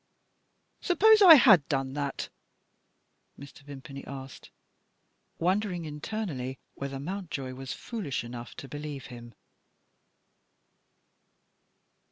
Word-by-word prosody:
Suppose 430 +4 +5
I 350 -5 +11
had 215 - +6
done 135 -3 -1
that?" 140 -1 -4 1.1
Mr. 140 0 -12
Vimpany 140 -1 -10
asked, 135 0 -9 0.9
wondering 180 -1 0
internally 150 -4 -5 0.2
whether 140 0 -6
Mountjoy 155 -5 -5
was 130 0 -6
foolish 200 - -4
enough 120 0 -9
to 135 - -9
believe 145 -1 -7
him. 120 -2 -11
145 Hz, 90 wpm, -28 LUFS, 135-190 Hz, 1.1 s, I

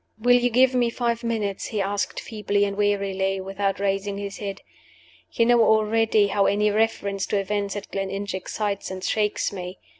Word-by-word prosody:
"Will 245 +3 +5
you 245 0 +2
give 255 +2 +4
me 245 -2 +2
five 235 0 -2
minutes?" 215 -4 -2
he 215 - -3
asked, 200 +1 -1
feebly 205 -2 -1
and 200 0 -3
wearily, 195 -1 0
without 195 +1 -2
raising 200 0 -1
his 200 0 -6
head. 200 -1 -5 0.7
"You 230 - +2
know 240 -1 +5
already 220 0 +3
how 200 0 +2
any 210 +1 +2
reference 200 -2 0
to 205 - 0
events 200 0 -2
at 205 0 -7
Gleninch 195 +1 -3
excites 200 +2 -3
and 185 0 -6
shakes 210 0 0
me. 180 -1 -6
205 Hz, 175 wpm, -24 LUFS, 195-220 Hz, 0.7 s, Will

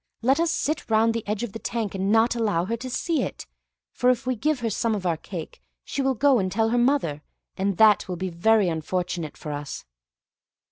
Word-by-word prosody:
Let 270 +5 +3
us 335 0 +2
sit 310 -3 -2
round 225 +1 +3
the 230 -1 -3
edge 210 +2 -2
of 225 -5 -5
the 225 - -6
tank 225 -4 -3
and 195 +1 -1
not 225 +2 +4
allow 205 -7 0
her 230 +4 -1
to 250 +3 -7
see 320 +6 0
it, - - -5 0.5
for 250 - +1
if 250 +1 +1
we 255 0 0
give 285 +3 0
her 230 - 0
some 225 +2 0
of 195 -3 -5
our 170 -2 +2
cake, 165 0 -8 0.2
she 280 - -3
will 265 -1 +1
go 270 +1 +4
and 185 -1 -1
tell 225 +3 +1
her 240 - +1
mother; 240 - +1 0.3
and 195 -1 -1
that 215 -2 +5
will 180 - -3
be 185 +1 -3
very 205 +4 +3
unfortunate 170 0 -3
for 150 - -6
us." 145 -1 -6
220 Hz, 225 wpm, -25 LUFS, 185-245 Hz, 0.5 s, that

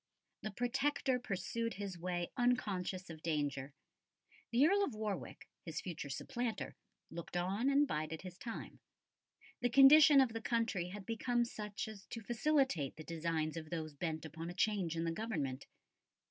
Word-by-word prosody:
The 215 - -3
Protector 260 +3 0
pursued 230 +1 -2
his 200 -1 -4
way 175 0 -2
unconscious 195 -7 0
of 160 -1 -10
danger. 145 -4 -2 0.7
The 245 +4 +5
Earl 400 +5 +4
of 280 - -2
Warwick, 215 -3 -4 0.2
his 160 -3 -4
future 165 -5 -5
supplanter, 230 - -3 0.4
looked 170 +1 -5
on 195 +9 +1
and 285 +1 +4
bided 155 - -3
his 180 0 -9
time. 230 -2 -6 0.8
The 245 - +2
condition 275 +3 +9
of 255 -4 +4
the 225 - -3
country 225 -7 0
had 200 +1 -7
become 240 +1 +1
such 210 -3 -5
as 210 -3 -10
to 230 - -6
facilitate 240 - +1
the 155 - -8
designs 160 -1 -1
of 155 -1 -6
those 155 -2 -4
bent 160 +1 -3
upon 160 +2 -6
a 175 - -7
change 185 -4 +1
in 165 - 0
the 165 - 0
Government. 150 - -3
195 Hz, 160 wpm, -36 LUFS, 165-240 Hz, 0.8 s, condition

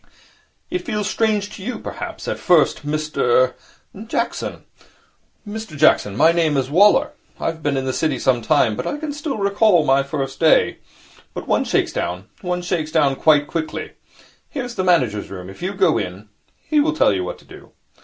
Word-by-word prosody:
'It 360 - 0
feels 210 - -3
strange 210 -2 0
to - - -10
you, 235 +5 -4
perhaps, - - -7
at - - -3
first, 175 -6 +3
Mr 145 -4 +1 0.2
' 215 +3 -13
'Jackson.' - - -3 0.8
'Mr 210 -6 -7
Jackson. 105 -9 +3
My 160 +4 +6
name 165 -4 +1
is 135 0 -1
Waller. 200 +6 +5 0.3
I - - -5
have 165 -1 -2
been 145 -2 0
in 135 - -2
the 130 - -1
City 160 +2 0
some 130 -3 +1
time, 130 -6 +2
but - - -4
I 295 - -2
can 300 -1 -5
still 290 -3 -4
recall 200 -4 +3
my 135 0 +4
first 135 -1 -4
day. 160 -1 +3 0.6
But - - -6
one - - +1
shakes - - 0
down. 90 +4 -4
One 180 -1 -2
shakes 165 -3 -2
down 145 -4 +2
quite 150 0 +4
quickly. 160 0 -4 0.6
Here 275 - -4
is 245 -1 -6
the 190 - -2
manager's 125 - +1
room. 95 -1 -8
If 95 - -15
you 190 +3 -3
go 185 -4 +3
in, 95 +2 -6 0.3
he 305 - +1
will 315 +2 +2
tell 105 - +4
you 95 -2 -1
what 90 - -5
to - - -21
do.' - - -14
155 Hz, 195 wpm, -20 LUFS, 135-200 Hz, 0.8 s, My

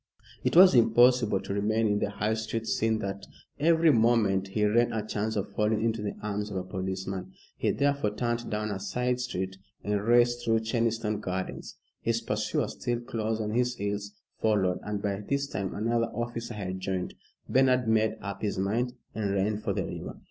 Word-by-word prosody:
It - - 0
was 185 +2 +9
impossible 120 -3 +5
to - - -4
remain 110 +3 +1
in 105 -1 +2
the 100 - 0
High 105 +2 -1
Street, 110 0 -3
seeing 110 0 +1
that 100 0 -4 0.4
every 165 +1 +5
moment 110 -5 +3
he 105 +2 0
ran 120 +3 +3
a 110 -2 -2
chance 110 0 -2
of 100 -2 -3
falling 105 +1 +1
into 115 -1 0
the 105 -1 -3
arms 105 0 -2
of 100 - -4
a 90 - -2
policeman. 95 0 -4 0.2
He - - 0
therefore 140 -7 +1
turned 120 0 -2
down 105 0 -2
a 95 - -3
side 125 +5 -1
street 95 -6 -3 0.3
and 105 -1 0
raced 120 +2 +3
through 115 -1 +2
Cheniston 115 -2 0
Gardens. 95 0 -4 0.2
His 115 0 +1
pursuer, 110 -1 -1
still 120 -1 -3
close 110 -2 -2
on 105 -1 -2
his 125 +2 +1
heels, 100 -1 -3 0.3
followed, 100 -5 +2
and 105 -1 -4
by 100 -1 -1
this 140 0 +1
time 100 -7 -4
another 115 +2 +1
officer 120 0 -4
had 95 -2 -4
joined. 95 -1 -3 0.3
Bernard 130 -2 +3
made 110 0 +2
up 100 -1 -6
his 105 -3 -1
mind 115 +6 0 0.2
and 105 -3 -1
ran 105 +2 0
for - - -2
the - - -1
river. - - -6
110 Hz, 185 wpm, -28 LUFS, 100-120 Hz, 0.4 s, was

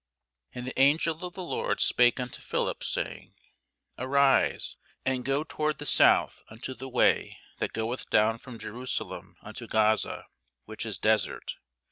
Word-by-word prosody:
And 125 0 -7
the 130 - -5
angel 155 +4 +3
of 180 -1 -6
the 185 - -5
Lord 175 - -1
spake 120 +1 +4
unto 125 -1 -5
Philip, - - -2
saying, - - -4 0.6
Arise, 135 +1 +2 0.3
and 130 -1 0
go 135 +3 0
toward 155 -1 -2
the 145 - -7
south - - +4
unto 115 +4 -7
the 130 +2 -8
way - - +2 0.2
that - - -2
goeth 115 +3 -3
down 110 +2 +3
from 125 -2 -10
Jerusalem 125 +3 -5
unto - - -8
Gaza, 110 0 +1 0.4
which 110 +1 -5
is 105 -4 -4
desert. 110 -2 +1
125 Hz, 145 wpm, -28 LUFS, 110-140 Hz, 0.6 s, spake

